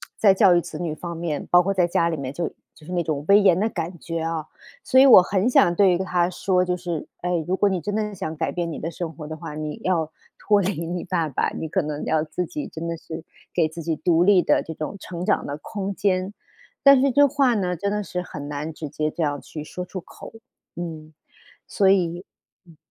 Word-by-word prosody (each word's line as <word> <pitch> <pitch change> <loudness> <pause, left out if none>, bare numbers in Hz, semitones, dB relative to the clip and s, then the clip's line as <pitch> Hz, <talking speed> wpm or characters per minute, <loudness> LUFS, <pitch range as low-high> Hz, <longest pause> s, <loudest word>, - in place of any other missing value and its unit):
在 200 -3 +5
教 185 -1 +5
育 175 - +3
子 - - -8
女 160 -3 -3
方 170 0 -6
面， 165 -4 -3
包 175 - +7
括 195 +2 0
在 180 -2 +3
家 170 -1 +1
里 165 - -1
面 135 -2 -5
就 170 +3 -2 0.3
就 150 - -18
是 180 - -7
那 175 -1 +1
种 150 -2 -3
威 200 +1 +7
严 185 -3 +4
的 220 - +2
感 175 -4 -5
觉 165 0 -4
啊。 165 -1 -2 0.4
所 260 - +2
以 265 - +9
我 255 -8 +10
很 195 +5 +1
想 175 -7 +4
对 195 0 +5
于 175 - +2
她 180 -1 0
说， 185 0 +1
就 180 0 -1
是： 175 -3 -5
“哎， 175 -2 -1
如 185 +1 -1
果 205 - +3
你 185 -3 -1
真 205 +5 -4
的 220 - +1
很 210 -1 -5
想 160 -3 -4
改 160 - -2
变 170 -1 -2
你 - - -6
的 165 - -3
生 170 -1 -5
活 150 -2 -9
的 155 - -5
话， 150 - -8
你 155 -1 -5
要 165 -4 0 0.3
脱 205 -2 +3
离 175 -3 -2
你 175 +1 -4
爸 170 -3 -1
爸， 140 - 0
你 160 - -5
可 - - 0
能 150 0 -4
要 155 -1 +1
自 180 +3 -3
己 295 - -5
真 165 +1 -6
的 170 - -2
是 160 0 -9 0.3
给 165 -3 +2
自 165 +2 -8
己 160 -1 -1
独 170 -1 +3
立 195 -2 +5
的 - - +2
这 160 - -7
种 155 +6 -5
成 180 -1 -6
长 - - +1
的 140 +1 -4
空 200 +5 -5
间。” 190 0 0 0.5
但 275 -2 +7
是 275 - +3
这 285 +3 +5
话 270 -2 +2
呢， 180 -4 -1
真 200 +4 -2
的 210 0 -1
是 180 -2 -4
很 150 -5 -8
难 150 +2 -4
直 155 - -6
接 155 +1 -2
这 170 - -5
样 145 -1 -1
去 155 - -8
说 180 +3 -6
出 185 +1 -6
口， 180 - -12 0.4
嗯， 160 -3 -7 0.5
所 200 - +2
以 175 -1 +1 0.4
嗯。 165 -3 -18
175 Hz, 265 characters per minute, -23 LUFS, 160-190 Hz, 0.5 s, 我